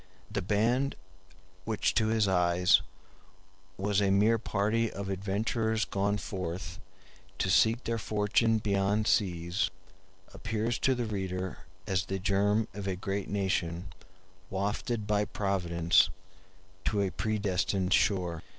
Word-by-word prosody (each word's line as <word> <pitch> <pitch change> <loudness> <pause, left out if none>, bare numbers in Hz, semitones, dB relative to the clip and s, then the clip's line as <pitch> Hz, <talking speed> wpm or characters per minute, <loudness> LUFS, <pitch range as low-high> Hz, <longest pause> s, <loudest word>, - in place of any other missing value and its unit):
The 105 - -1
band 115 +8 +1 0.7
which 110 +2 0
to 110 -2 +2
his 110 -2 +2
eyes 90 -1 +4 1.0
was 100 +1 +1
a 100 - +2
mere 105 +4 +4
party 110 +2 0
of 100 -1 -5
adventurers 110 +3 0
gone 100 +1 0
forth 90 -3 -5 0.6
to 95 - 0
seek 115 +4 +4
their 115 0 -2
fortune 110 +2 +2
beyond 100 0 +1
seas 90 -2 +1 0.6
appears 110 +2 -2
to 130 - +2
the 120 -1 -2
reader 95 -3 -4 0.2
as 95 0 0
the 95 - -3
germ 100 +3 +1
of 100 -1 -5
a 95 - -1
great 95 +2 -3
nation 95 -3 -2 0.6
wafted 105 +3 -2
by 105 0 +2
Providence 90 -5 +2 0.8
to 100 -2 +1
a 95 - -1
predestined 100 -3 0
shore. 90 -7 +1
100 Hz, 125 wpm, -30 LUFS, 95-110 Hz, 1.0 s, eyes